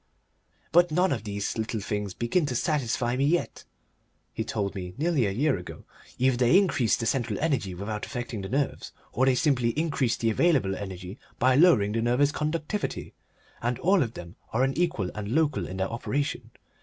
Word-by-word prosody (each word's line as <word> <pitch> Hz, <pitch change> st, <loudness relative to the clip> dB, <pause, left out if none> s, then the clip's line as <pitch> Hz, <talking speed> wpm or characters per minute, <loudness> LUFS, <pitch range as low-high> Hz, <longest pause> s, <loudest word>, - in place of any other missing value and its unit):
"But 175 Hz, +1 st, +5 dB
none 180 Hz, +4 st, +2 dB
of 115 Hz, -5 st, -2 dB
these 100 Hz, +2 st, -3 dB
little 110 Hz, 0 st, -2 dB
things 105 Hz, -1 st, -3 dB
begin 145 Hz, +7 st, +1 dB
to 125 Hz, -, -2 dB
satisfy 125 Hz, -3 st, 0 dB
me 135 Hz, +2 st, +1 dB
yet," 170 Hz, +3 st, -1 dB, 0.7 s
he 110 Hz, -, -2 dB
told 105 Hz, -3 st, -2 dB
me 90 Hz, -2 st, -6 dB
nearly 150 Hz, -6 st, +1 dB
a -, -, -1 dB
year 135 Hz, -, +1 dB
ago. 90 Hz, -, -10 dB, 0.3 s
"Either 130 Hz, -1 st, +2 dB
they 125 Hz, +8 st, +5 dB
increase 140 Hz, -, +3 dB
the 115 Hz, -, -3 dB
central 115 Hz, -3 st, 0 dB
energy 130 Hz, -, 0 dB
without 105 Hz, +3 st, -4 dB
affecting 120 Hz, -4 st, -5 dB
the 95 Hz, -, -6 dB
nerves 140 Hz, +2 st, -2 dB, 0.2 s
or 130 Hz, +3 st, +2 dB
they 130 Hz, -, +4 dB
simply 125 Hz, -5 st, +1 dB
increase 145 Hz, -7 st, +1 dB
the 115 Hz, -1 st, +1 dB
available 130 Hz, -, +2 dB
energy 95 Hz, 0 st, -7 dB, 0.2 s
by 130 Hz, +1 st, +4 dB
lowering 130 Hz, -, +5 dB
the 115 Hz, +1 st, 0 dB
nervous 125 Hz, +5 st, +2 dB
conductivity; 155 Hz, +7 st, -3 dB, 0.5 s
and 120 Hz, +1 st, -1 dB
all 190 Hz, +1 st, +3 dB
of 115 Hz, -4 st, -2 dB
them 85 Hz, +2 st, -9 dB
are 125 Hz, +3 st, +2 dB
unequal 135 Hz, -, 0 dB
and 105 Hz, +4 st, -4 dB
local 155 Hz, -4 st, +1 dB
in 95 Hz, -, -6 dB
their 95 Hz, 0 st, -1 dB
operation. 140 Hz, +4 st, -2 dB
120 Hz, 180 wpm, -27 LUFS, 105-150 Hz, 0.7 s, But